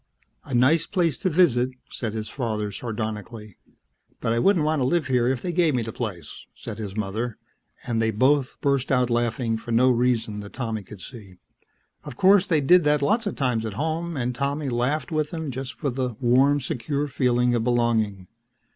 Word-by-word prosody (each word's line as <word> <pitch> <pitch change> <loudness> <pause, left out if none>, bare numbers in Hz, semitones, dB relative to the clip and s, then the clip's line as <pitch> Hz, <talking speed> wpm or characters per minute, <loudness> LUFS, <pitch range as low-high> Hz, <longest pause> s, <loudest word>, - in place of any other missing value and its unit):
"... - - -41
'A 135 - -3
nice 130 +7 +3
place 170 -7 +1
to 185 - -1
visit' 145 -8 +3 0.2
..." - - -30
said 110 -3 -4
his 110 -1 -3
father 110 -5 -3
sardonically. 110 -1 -6 0.3
"... - - -42
'but 115 - 0
I 115 - +1
wouldn't 180 0 +3
live 155 +1 +1
here 125 -2 +2
if 130 -1 -1
they 180 - -1
gave 170 -4 +2
me 120 - 0
the 115 - -6
place!' 90 -10 -6
..." - - -49
said 110 -1 -8
his 105 -1 -6
mother, 110 +3 -3 0.5
and 115 -2 0
they 110 - +2
both 130 +5 +1
burst 140 -2 +1
out 125 -2 +2
laughing 120 -1 0
for 115 +1 -8
no 125 +3 +4
reason 115 -3 0
that 100 0 -9
Tommy 115 -4 -3
could 100 0 -12
see. 105 -7 -11 0.7
Of 120 - -9
course, 195 0 +5
they 160 -4 +2
did 175 +5 +5
that 150 -1 +2
lots 220 +10 +1
of 200 - -3
times 125 -5 0
at 110 -2 -4
home 160 +5 -2
and 125 -1 -1
Tommy 140 +2 -2
laughed 130 +7 -1
with 155 -1 0
them 160 -4 -4
just 130 0 -6
for 145 -4 -2
the 125 -2 -3
warm, 135 +3 +3
secure 140 +2 -2
feeling 125 -2 +1
of 120 -2 +1
belonging. 115 -6 0
125 Hz, 200 wpm, -24 LUFS, 115-145 Hz, 0.7 s, course